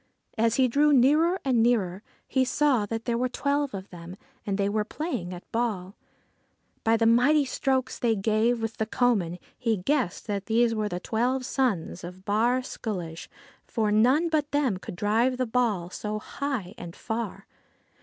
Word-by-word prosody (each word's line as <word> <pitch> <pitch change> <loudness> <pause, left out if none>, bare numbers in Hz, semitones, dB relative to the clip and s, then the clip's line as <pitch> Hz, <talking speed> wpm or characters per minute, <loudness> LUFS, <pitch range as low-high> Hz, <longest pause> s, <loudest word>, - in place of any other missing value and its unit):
As 230 0 +2
he 260 0 +4
drew 290 +5 +3
nearer 305 +7 +4
and 250 -4 +3
nearer, 205 -6 +1 0.3
he 260 - +2
saw 260 -5 +2
that 225 +2 -4
there 235 -1 0
were 255 0 0
twelve 280 0 -1
of 190 0 -8
them, 175 +1 -9 0.3
and 195 -1 0
they 200 -1 +1
were 210 +1 0
playing 220 - -4
at 180 0 -10
ball. 210 -5 -2 0.9
By 225 0 +3
the 225 - +2
mighty 265 +6 +4
strokes 260 0 -1
they 230 -2 +2
gave 225 +3 +1
with 225 0 -3
the 220 - -1
coman 215 -9 +1 0.2
he 225 -3 +1
guessed 230 0 -1
that 200 -2 -3
these 230 +1 +3
were 215 -1 -1
the 180 - -3
twelve 250 +6 -1
sons 225 -12 -1
of 180 +2 -9
Bawr 235 +5 +2
Sculloge, 175 -10 -5 0.3
for 215 -3 -1
none 255 +10 +4
but 305 -3 0
them 275 -9 +1
could 185 - -8
drive 225 +7 +1
the 255 - 0
ball 220 -7 0
so 210 +2 -4
high 250 -4 -4
and 175 -1 -8
far. 220 -3 -4
225 Hz, 175 wpm, -27 LUFS, 200-255 Hz, 0.9 s, he